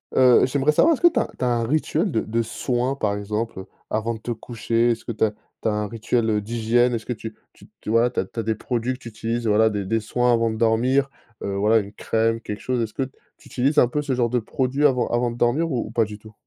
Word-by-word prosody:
heu, 125 -2 +6
j'aimerais 140 +3 +2
savoir: 320 - +4
est-ce - - -12
que 345 - +8
tu - - +2
as - - 0
tu 130 - -1
as - - +2
un 120 -1 +1
rituel 155 - 0
de 110 - +1
de 115 +2 -1
soins, 125 +3 -1
par 105 -6 -1
exemple, 105 +1 -3
heu, 95 - -9 0.2
avant 110 +2 -1
de - - -10
te 120 - -5
coucher? 115 0 0
Est-ce 115 - -4
que - - -3
tu 110 - -1
as 110 - +3 0.3
tu - - -1
as - - +1
un 105 0 -1
rituel, 115 +1 -1
heu, 105 -1 +1
d'hygiène? 120 +3 +1
Est-ce 110 - -5
que 125 - -2
tu 110 -1 -8 0.2
tu - - -18
tu - - -8
voilà, 115 +2 +4
tu 125 - -3
as - - 0
tu 115 - -8
as - - -1
des 110 +1 0
produits 120 +2 -2
que 130 - -10
tu 120 - -9
utilises? 115 +2 -3
Voilà, 110 +1 +4
des 105 -2 -3
des 115 +4 +1
soins 125 +3 +1
avant 115 -1 +2
de 110 - -4
dormir, 125 +5 +2 0.3
heu, 100 - -2
voilà, 105 +3 +3
une 100 -1 -2
crème, 115 +1 0
quelque 105 -2 -6
chose? 125 -2 -1
Est-ce 110 -2 -3
que 135 - -1
t 130 +1 -9 0.2
tu - - -18
utilises 135 +4 0
un 125 - +6
peu 150 +5 -2
ce 140 -3 -1
genre 120 -1 +1
de 125 - +2
produits 130 +5 -1
avant 125 -3 +1
avant 120 0 +1
de 120 - -7
dormir 145 +8 +1
ou 120 -4 -1
ou 110 - -9
pas 115 -1 +2
du 105 0 -8
tout? 110 0 -15
115 Hz, 290 wpm, -23 LUFS, 110-125 Hz, 0.3 s, que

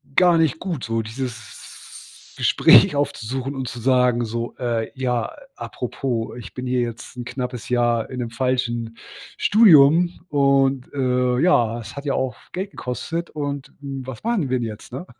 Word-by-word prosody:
gar 175 -2 +5
nicht 160 -2 +1
gut 170 -8 -4
so, 115 0 -1
dieses 120 +2 -9
Gespräch - - +6
aufzusuchen 135 -1 -2
und 130 -1 -4
zu 120 -1 -6
sagen 125 -1 +2
so: 115 +1 -4
„Äh, 115 -3 -2
ja, 125 -3 -1 0.2
apropos, 120 -2 -4
ich 120 - -10
bin 125 0 -5
hier 125 0 +1
jetzt 120 +1 -6
'n 120 - -5
knappes 125 -1 -5
Jahr 120 -2 +1
in 130 - -6
'nem 120 -2 -4
falschen 120 -2 -1 0.4
Studium. 175 -4 +5
Und, 135 -2 +2
äh, 125 -2 +1
ja, 120 -9 +3
es 115 0 -9
hat 140 +1 -7
ja 140 - 0
auch 130 -3 -1 0.2
Geld 190 +2 -4
gekostet 165 +7 -4
und, 145 -2 -4
hm, 140 -1 -6
was 130 -4 -8
machen 220 - 0
wir 130 - +1
denn 115 - -2
jetzt.“, 110 +2 -9
ne? 135 +8 -6
125 Hz, 165 wpm, -22 LUFS, 120-140 Hz, 0.4 s, Gespräch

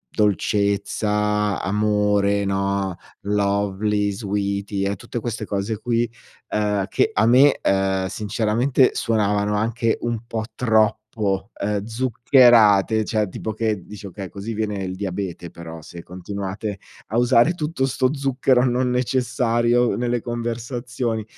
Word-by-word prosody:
dolcezza, 105 0 +1
amore, 105 0 +1
no, 100 -1 -1 0.3
lovely, 100 0 0
sweety 100 -1 -2
e 100 +1 -1
tutte 120 - -6
queste 115 -1 -4
cose 100 +2 -3
qui, 120 0 0 0.4
ehm, 105 -2 0
che - - +1
a 110 - +2
me, 130 +4 +5
ehm, 95 -1 +1
sinceramente 110 +6 +1
suonavano 105 -2 0
anche 115 +2 0
un 120 -1 -2
po' 110 -2 -3
troppo, 110 -3 +2 0.6
ehm, 100 0 -1
zuccherate, 115 -3 +4
cioè 105 -1 0
tipo 110 +4 -5
che 110 -4 -2
dici: 105 -1 -10
"Okay 95 0 -7
così 100 +5 -6
viene 105 -2 -2
il 95 0 -4
diabete 95 -3 -5
però 85 -1 -9
se 85 +2 -10
continuate 100 +3 -5 0.3
a 110 - -1
usare 125 +5 +4
tutto 150 -4 -2
sto 130 -1 +1
zucchero 130 -2 +2
non 125 0 +1
necessario 120 -1 +1
nelle 120 0 -1
conversazioni". 120 0 -3
105 Hz, 125 wpm, -22 LUFS, 100-120 Hz, 0.6 s, me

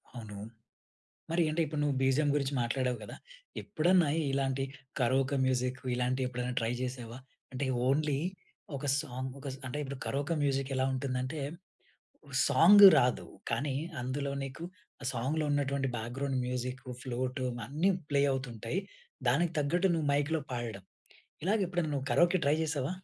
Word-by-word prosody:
అవును. 110 -4 -7 0.9
మరి 170 0 +3
అంటే, 160 +2 0
ఇప్పుడు 155 0 -4
నువ్వు 145 -2 +1
బిజిఎమ్ 140 +2 +3
గురించి 140 -1 0
మాట్లాడావు 125 +1 0
గదా! - - -8 0.5
ఎప్పుడన్నా 175 0 +3 0.2
ఇలాంటి 135 -1 0 0.4
కరోకా 130 +3 +2
మ్యూజిక్ 125 0 0 0.2
ఇలాంటివి 125 +1 0
ఎప్పుడైనా 125 0 -3
ట్రై 115 +1 0
జేశావా? 125 -2 -5 0.3
అంటే 130 +1 -2 0.2
ఓన్లీ 145 0 +2 0.6
ఒక 140 - -5
సాంగ్ 130 -3 -4
ఒక 140 - -8
స్ - - -9
అంటే 130 - -4
ఇప్పుడు 140 -1 -5
కరోకా 145 +4 -1
మ్యూజిక్ 135 -1 0
ఎలా 130 0 +2
ఉంటుందంటే, 130 +2 -2 1.1
సాంగ్ 180 +9 +8
రాదు. 125 -1 +1 0.2
కానీ, 140 -2 0 0.2
అందులో 140 +3 -2
నీకు 135 +5 -7 0.4
ఆ - - -7
సాంగ్‌లో 135 +6 -1
ఉన్నటువంటి 140 -1 0
బ్యాక్‌గ్రౌండ్ 130 +4 -2
మ్యూజిక్, 125 0 -3 0.2
ఫ్లూట్ 130 0 -3 0.3
అన్నీ 155 +9 +1 0.2
ప్లే 140 -1 +3
అవుతుంటాయి. 125 - -3 0.5
దానికి 170 -1 +2
తగ్గట్టు 175 +6 +2
నువ్వు 155 -3 0
మైక్‌లో 145 +2 +1
పాడడం, 115 -6 -4 0.6
ఇలాగ 205 +5 +2
ఎప్పుడన్నా 175 -4 -1
నువ్వు 135 -1 -2
కరోకే 175 +5 +4
ట్రై 145 +2 +4
జేశావా? 145 -2 -1
135 Hz, 140 wpm, -31 LUFS, 125-150 Hz, 1.1 s, సాంగ్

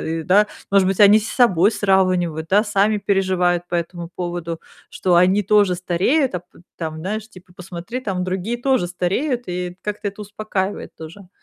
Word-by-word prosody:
а, - - -5
ы" 160 0 -3
Да? 205 +4 +4 0.3
Может 195 -2 +4
быть, 195 - -1
они 210 +1 +7
с 220 - -6
собой 205 -5 +3
сравнивают, 185 -6 +1
да? 205 +3 +4
Сами 210 +1 +2
переживают 185 -3 0
по 175 - -1
этому 170 0 -4
поводу, 175 -2 -5 0.3
что 180 -2 0
они 185 +4 +4
тоже 205 -2 +3
стареют, 190 - +1
а 180 - -2
п 180 - -24
п - - -18
там, 160 -2 -5
знаешь 215 +5 -4
типа: 185 -2 -16
"Посмотри, 180 +6 -7
там 190 -6 -3
другие 190 +6 -2
тоже 260 -9 +1
стареют"- 180 - -1 0.2
и 180 0 -4
как-то 210 0 -3
это 200 +1 -8
успокаивает 205 -1 -4
тоже. 170 +4 -11
185 Hz, 185 wpm, -20 LUFS, 175-205 Hz, 0.3 s, они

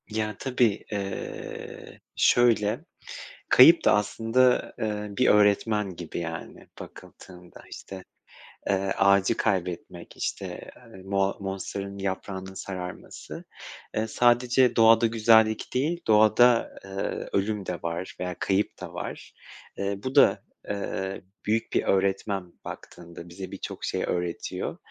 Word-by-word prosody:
Ya, 105 -1 -2
tabii, 125 -5 +1
eee, 100 -2 -6 0.2
şöyle, 115 -4 +3 0.6
kayıp 165 +7 +8
da - - +6
aslında, 115 +5 +1
eee, 105 -1 -2
bir 130 - +3
öğretmen 105 -1 +3
gibi 85 -1 -6
yani, 80 -1 -7
bakıldığında, 90 -1 -13
işte, 95 -1 -9 0.7
eee, 95 -1 +1
ağacı 100 +3 +3
kaybetmek, 90 -4 -3
işte, - - -5 0.2
ııı, 95 -5 -13
moa 95 0 0
monsteranın 100 0 -5
yaprağının 95 -1 -4
sararması. 90 -2 -7 0.5
Iıı, 110 +1 0
sadece 125 +2 +3
doğada 115 0 +6
güzellik 110 -1 +3
değil, 155 +7 0
doğada, 110 +2 +4
ııı, 95 0 -4
ölüm 100 0 -1
de 90 - -3
var, 85 +2 -4
veya 90 -1 -3
kayıp 95 +2 0
da - - -7
var. - - -7 0.4
Iıı, 100 0 -3
bu 130 +1 -4
da, 140 - +5 0.3
ııı, 95 -1 -3 0.2
büyük 110 +2 -1
bir - - +2
öğretmen 95 -1 0
baktığında, 85 0 -10
bize 95 +2 -8
birçok - - -7
şey - - -2
öğretiyor. 90 -1 -3
100 Hz, 120 wpm, -26 LUFS, 95-110 Hz, 0.7 s, kayıp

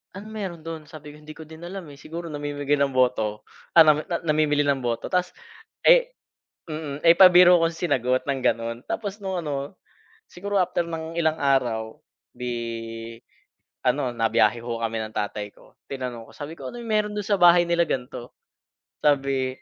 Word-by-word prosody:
anong 210 +3 -9
meron 190 -6 -5
don? 165 -1 -6
sabi 150 -2 -11
ko, - - -15
hindi 150 0 -12
ko 160 - -10
din 160 +1 -13
alam 190 +1 -7
eh, 140 - -14
siguro 170 +3 -7
namimigay 145 -1 -2
ng 140 -2 +1
boto. 110 -5 +1 0.3
Ah, 165 - +10
na 155 -1 +4 0.2
namimili 150 -2 +2
ng 140 -1 +1
boto 120 -1 -3
tas, 180 0 0 0.6
eh - - +5 0.6
mm, 150 -2 -5
eh, 165 - +8
pabiro 180 -1 +8
kong 165 0 +1
sinagot 130 -7 0
ng 140 -1 -1
ganon 115 0 0
tapos 205 -2 -4
nung 190 -1 -3
ano, 145 -1 -4 0.6
siguro 200 +2 -2
after 180 -1 +1
ng 165 0 -6
ilang 160 -1 +1
araw 120 -5 0 0.4
di 115 -2 -5 0.7
ano 130 0 +1
nabiyahe 115 -1 +2
ho 115 -1 -4
kami 115 0 -2
ng 110 0 -8
tatay 105 0 -3
ko. - - -21 0.2
Tinanong 125 -4 -6
ko - - -15
sabi 145 +2 -7
ko - - -7
anong 240 0 -8
meron 210 -1 0
don 210 - -2
sa 200 -1 +1
bahay 175 0 +7
nila 170 0 +3
ganto? 125 -2 -5 0.7
Sabi 135 -3 +1
eh, - - -28
145 Hz, 175 wpm, -24 LUFS, 125-170 Hz, 0.7 s, Ah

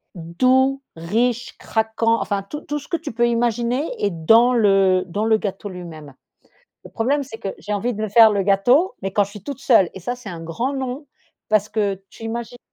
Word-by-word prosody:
doux, 255 +11 +1 0.2
riche, 230 +8 -1
craquant 225 +1 0
enfin 200 -1 -2
tout 295 +10 -7
tout 295 - -4
ce 290 - -14
que 335 - 0
tu 300 -6 -7
peux 240 +1 +2
imaginer 240 +4 0
est - - +3
dans 225 +9 +4
le 195 -4 +3
dans 200 +5 -3
le 220 -1 +4
gâteau 205 -1 -5
lui-même. 160 -6 -10 0.7
Le - - -12
problème, 275 +6 0
c'est 225 -4 -10
que 200 - -5
j'ai 210 - -6
envie 230 +4 -1
de 215 - -5
le 215 - -1
faire 220 +2 +7
le 200 -1 +1
gâteau 245 - +3
mais 195 - -4
quand 205 - +3
je 200 - -12
suis 205 -2 -11
toute 275 -2 -6
seule 200 -9 +4
et 190 - -8
ça 245 +8 -4
c'est 245 -4 -11
un 170 -3 -7
grand 230 - -3
non 265 +2 -4 0.4
parce 215 -1 +2
que 200 -3 -2
tu 225 - -12
imagines 235 +1 -5
225 Hz, 210 wpm, -21 LUFS, 195-245 Hz, 0.7 s, faire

